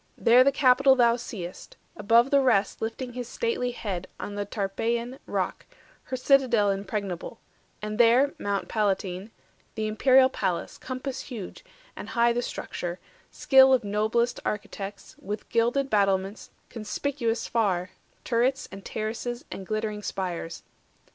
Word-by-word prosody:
There 245 +2 +6
the 275 - +4
Capitol 270 0 +5
thou 235 -2 +4
seest, 200 -7 -8 0.2
Above 230 +5 +3
the 280 -1 +5
rest 225 -7 +2
lifting 240 +3 -4
his 245 -1 -5
stately 460 - -1
head 200 -7 -4
On 205 - -5
the 205 0 -3
Tarpeian 230 +5 -2
rock, - - -3 0.4
her 255 - -4
citadel 250 -6 +3
Impregnable; 195 -2 -4 0.4
and 215 +1 -4
there 245 +4 +5
Mount 200 -1 -2
Palatine, 195 -3 -1 0.3
50 - - -36
The 220 -1 -2
imperial 260 +4 +5
palace, 190 -8 -3
compass 255 +1 -5
huge, 235 - -8 0.3
and - - -8
high 235 0 +3
The 240 - 0
structure, 175 -6 -5 0.3
skill 265 -1 +6
of 245 - -2
noblest 220 +4 0
architects, 205 -1 -5
With 205 +2 -6
gilded 240 +4 +1
battlements, 195 0 +1 0.2
conspicuous 230 +1 -2
far, 190 -6 0 0.3
Turrets, 255 +3 +1
and 195 0 -9
terraces, 230 +4 -4
and 190 - -7
glittering 215 -1 -2
spires. 180 -4 -4
225 Hz, 135 wpm, -26 LUFS, 200-250 Hz, 0.4 s, There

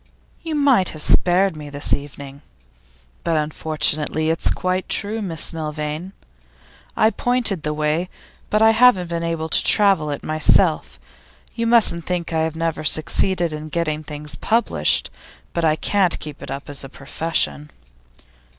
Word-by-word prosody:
'You 325 -2 -4
might 270 -10 +3
have - - -4
spared 185 0 +3
me 150 -1 -9
this 145 0 -2
evening. 140 -1 -6 0.8
But 165 -2 0
unfortunately 155 0 0
it's 165 - 0
quite 185 0 -2
true, 215 +2 -1
Miss 170 -4 0
Milvain. 155 +3 -5 0.8
I 220 - +4
point 240 -9 0
the 150 - -2
way, 155 +4 -1 0.4
but 215 +1 +2
I 220 - +6
haven't 225 -6 +4
been 170 0 -2
able 165 -1 -2
to - - +2
travel 195 -7 +3
it 145 - -5
myself. 155 0 +2 0.5
You 230 -1 -2
mustn't 225 -8 +4
think 175 -2 -3
I 160 - +1
have 160 0 -2
never 165 -1 -2
succeeded 170 +2 +1
in 155 0 -7
getting 155 -2 -2
things 150 -1 -4
published; 230 +2 +1 0.4
but 170 - -2
I 155 -1 +3
can't 190 +1 +2
keep 150 -2 -8
it - - -8
up 135 +1 -6
as 145 -2 -6
a 135 - -9
profession. 150 +2 -2
165 Hz, 150 wpm, -20 LUFS, 150-190 Hz, 0.8 s, I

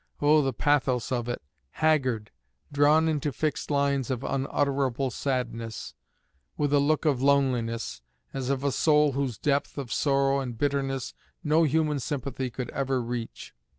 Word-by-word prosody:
oh, 150 +1 +5
the 135 -1 0
pathos 130 -2 +1
of 120 -1 -1
it! 120 - -4 0.3
haggard, 130 -9 +1 0.4
drawn 150 +3 +4
into 150 -2 0
fixed 155 +3 -2
lines 140 -3 +1
of 130 -1 -2
unutterable 135 -1 0
sadness, 115 -5 -3 0.6
with 145 -1 0
a 145 - +5
look 150 +3 +1
of 140 -5 +2
loneliness, 125 - +1 0.3
as 130 -1 -3
of 140 -1 -1
a 140 - +1
soul 150 +1 +3
whose 135 -4 -2
depth 140 +3 0
of 130 -6 -4
sorrow 140 -1 +2
and 125 -4 -5
bitterness 135 -1 -1 0.3
no 155 +2 +3
human 150 0 +1
sympathy 135 -2 -3
could 125 0 -5
ever 135 -1 -1
reach. 120 -1 -5
135 Hz, 150 wpm, -27 LUFS, 125-145 Hz, 0.6 s, oh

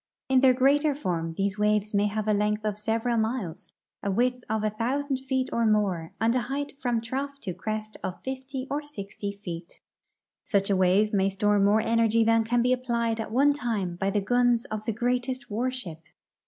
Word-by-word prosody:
In 265 -1 +5
their 255 -1 +5
greater 285 +3 +3
form 170 - -2
these 195 0 0
Avaves 210 0 +1
may 205 +1 +3
have 215 +1 -3
a 215 - +3
length 210 +1 0
of 210 - +1
seA^eral 225 +3 0
miles, 220 -7 -4 0.3
a 200 - -2
Avidth 245 +5 +1
of 220 0 0
a 215 - +1
thousand 265 +5 -1
feet 260 0 -1
or 235 - +1
more, 200 -7 +1
and 225 +1 +2
a 255 - +2
height 285 +1 -3
from 240 -3 0
trough 275 +4 -4
to 185 -5 -4
crest 215 +4 -4
of 180 - -4
fifty 265 0 -5
or 290 +1 0
sixty 205 -8 -6
feet. 170 -1 -7 0.6
Such 200 -1 +1
a - - +4
Avave 190 +3 +3
may 195 -1 +3
store 205 +1 +2
more 205 +2 +4
energy 230 0 +3
than 225 0 +4
can 235 +1 +1
be 250 +1 +3
applied 235 -2 -1
at 220 - -3
one 280 +5 +4
time 220 -10 -2
by 195 +2 0
the 205 +1 +1
guns 245 +2 +2
of 215 0 -4
the 225 - 0
greatest 245 +2 -1
Avarship. 225 -7 -3
225 Hz, 195 wpm, -27 LUFS, 205-255 Hz, 0.6 s, In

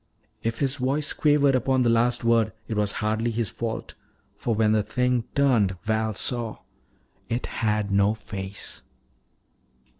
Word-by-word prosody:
If 115 0 -2
his 140 0 0
voice 140 +3 0
quavered 145 -2 +3
upon 130 0 +2
the 120 - +3
last 120 +1 +2
word, 115 -2 +3
it 110 - -3
was 105 -1 0
hardly 110 +2 +1
his 115 -2 -1
fault. 115 -1 -4 0.4
For 115 - -1
when 110 0 +3
the 110 -1 +3
thing 125 +1 0
turned, 115 -10 +3
Val 110 -1 0
saw 120 -1 -1 0.7
It 115 +2 -1
had 105 -2 -1
no 100 +2 +3
face! 100 -2 -7
115 Hz, 145 wpm, -25 LUFS, 105-125 Hz, 0.7 s, quavered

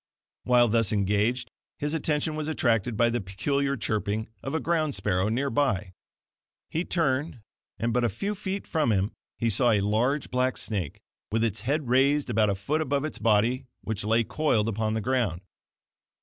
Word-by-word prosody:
While 125 -1 +5
thus 115 -2 +2
engaged, 105 +4 +1 0.3
his 145 +1 -2
attention 155 -1 0
was 155 -1 -3
attracted 120 -7 +1
by 120 +1 +3
the 120 0 -1
peculiar 140 +9 -1
chirping 110 -1 -2
of 135 +3 -4
a - - +1
ground 160 -4 0
sparrow 95 0 0
near 135 +5 0
by. 105 -8 0 0.8
He 165 +3 -1
turned, 140 -5 0 0.4
and 115 0 -1
but 125 - +2
a 120 - +3
few 195 - -3
feet 200 -1 -4
from 155 -7 +1
him 100 0 +1 0.3
he 115 - 0
saw 115 +3 +3
a 105 -3 +4
large 120 +8 0
black 125 0 +1
snake, 95 -9 -3 0.3
with 110 +1 +1
its 110 -2 -1
head 140 +4 -1
raised 135 +2 +3
about 110 -2 +3
a 100 - +1
foot 140 +12 -1
above 140 -1 0
its 155 - -4
body, 115 +4 +2
which 110 -3 -3
lay 115 +2 +3
coiled 115 -5 +1
upon 110 0 -1
the 110 - -1
ground. 105 -7 0
120 Hz, 180 wpm, -27 LUFS, 105-140 Hz, 0.8 s, While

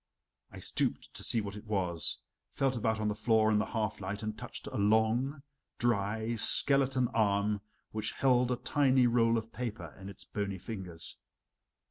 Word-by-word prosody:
I - - -12
stooped - - -3
to - - -8
see 115 - 0
what 100 -1 -7
it 105 +1 -10
was, 90 -5 -2 0.3
felt 135 -1 -1
about 110 -1 -1
on 110 - -1
the 105 - 0
floor 110 0 +2
in 105 - +2
the - - -1
half 110 -2 -3
light, 100 +3 -5
and 110 0 -4
touched 110 - -8
a - - -6
long, 110 +7 +1 0.3
dry, 110 0 -1
skeleton 130 +2 +6
arm 105 -2 0 0.3
which 110 0 -3
held 125 -2 +2
a - - +1
tiny 130 +1 +2
roll 115 -1 +2
of 110 0 -6
paper 105 -10 -6
in 95 0 -9
its 100 - -8
bony 100 -2 -4
fingers. 90 -5 -7
110 Hz, 170 wpm, -31 LUFS, 100-120 Hz, 0.3 s, skeleton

